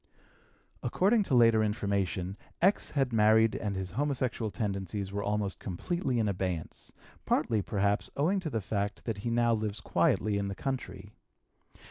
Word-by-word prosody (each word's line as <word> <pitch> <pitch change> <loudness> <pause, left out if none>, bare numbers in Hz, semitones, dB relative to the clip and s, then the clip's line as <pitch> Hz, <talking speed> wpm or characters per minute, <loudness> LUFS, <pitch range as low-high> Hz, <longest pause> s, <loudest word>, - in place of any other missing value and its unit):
According 210 +4 +2
to 135 - +1
later 115 -2 +6
information 100 -3 -1 0.2
X. 190 +4 +3
had 135 -4 0
married 110 0 +5
and 100 -2 -3
his 95 -1 -4
homosexual 130 -2 -1
tendencies 100 -2 -3
were 100 0 -2
almost 105 -1 -1
completely 130 - -2
in 110 -2 +1
abeyance, 90 -4 -3 0.3
partly, 110 -3 +1
perhaps, 100 +1 0
owing 175 +8 +2
to 175 -4 -4
the 115 -6 -2
fact 100 +1 -3
that 110 -4 -3
he 115 - -3
now 120 0 +3
lives 110 -1 -2
quietly 105 -2 +1
in 100 - -2
the 100 - -4
country. 105 -6 -5
105 Hz, 150 wpm, -30 LUFS, 100-120 Hz, 0.3 s, later